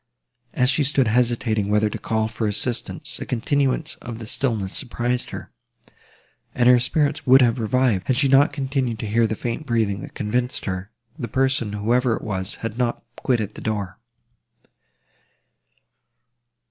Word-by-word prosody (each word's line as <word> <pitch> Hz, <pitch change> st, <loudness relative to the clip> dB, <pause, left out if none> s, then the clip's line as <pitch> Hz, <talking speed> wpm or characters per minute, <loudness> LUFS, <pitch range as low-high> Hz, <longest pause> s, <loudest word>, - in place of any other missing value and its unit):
As 125 Hz, +1 st, +4 dB
she 145 Hz, +2 st, +2 dB
stood 135 Hz, -2 st, +2 dB
hesitating 115 Hz, -3 st, +1 dB
whether 105 Hz, +1 st, +3 dB
to 105 Hz, -, -5 dB
call 110 Hz, -1 st, 0 dB
for 110 Hz, 0 st, -2 dB
assistance, 115 Hz, +3 st, -3 dB
the -, -, -6 dB
continuance 140 Hz, +5 st, 0 dB
of 115 Hz, -2 st, -7 dB
the 115 Hz, -, -7 dB
stillness 110 Hz, -5 st, -2 dB
surprised 120 Hz, +1 st, -2 dB
her; -, -, -8 dB, 1.0 s
and 120 Hz, -, +3 dB
her 125 Hz, -1 st, +7 dB
spirits 145 Hz, +4 st, 0 dB
would 130 Hz, +1 st, +8 dB
have 120 Hz, 0 st, +2 dB
revived, 115 Hz, -3 st, +1 dB
had 130 Hz, -, +2 dB
she 140 Hz, 0 st, +3 dB
not 135 Hz, +2 st, +5 dB
continued 135 Hz, -4 st, -1 dB
to 110 Hz, -, -5 dB
hear 115 Hz, +2 st, +3 dB
the 110 Hz, -, -2 dB
faint 120 Hz, +7 st, -4 dB
breathing, 110 Hz, -4 st, 0 dB
that -, -, -10 dB
convinced 120 Hz, +4 st, -1 dB
her, 95 Hz, +1 st, -4 dB, 0.3 s
the 120 Hz, -, -3 dB
person, 130 Hz, -3 st, 0 dB
whoever 115 Hz, +3 st, +1 dB
it -, -, -7 dB
was, 95 Hz, -1 st, -3 dB
had 115 Hz, +1 st, -4 dB
not 120 Hz, -1 st, -1 dB
quitted 110 Hz, -5 st, -1 dB
the -, -, -10 dB
door. 105 Hz, -3 st, -3 dB
120 Hz, 160 wpm, -23 LUFS, 110-130 Hz, 1.0 s, would